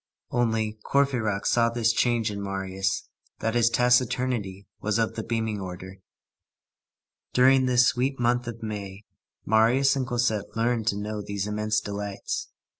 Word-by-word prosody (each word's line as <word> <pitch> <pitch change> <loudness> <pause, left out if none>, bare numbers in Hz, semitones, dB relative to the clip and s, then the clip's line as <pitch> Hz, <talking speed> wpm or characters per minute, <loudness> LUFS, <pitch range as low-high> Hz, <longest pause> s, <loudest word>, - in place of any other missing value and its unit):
Only, 110 -2 0
Courfeyrac 120 -8 +1
saw 115 -1 +3
this 115 -1 +1
change 115 -2 +1
in 100 -1 -5
Marius, 95 -1 -2 0.3
that 115 - -1
his 120 -1 +4
taciturnity 125 -5 +1
was 110 0 0
of 115 -1 0
the 110 - -4
beaming 110 -2 -2
order. 95 +1 -8 1.4
During 130 +1 +5
this 125 -1 +5
sweet 130 +2 -1
month 120 0 +1
of 115 -1 -7
May, 100 -2 -6 0.4
Marius 120 +6 +4
and 130 -2 -2
Cosette 120 -4 -1
learned 115 -1 0
to 100 - +1
know 105 +1 -4
these 100 -1 -3
immense 105 0 0
delights. 100 -1 -4
110 Hz, 140 wpm, -26 LUFS, 105-120 Hz, 1.4 s, During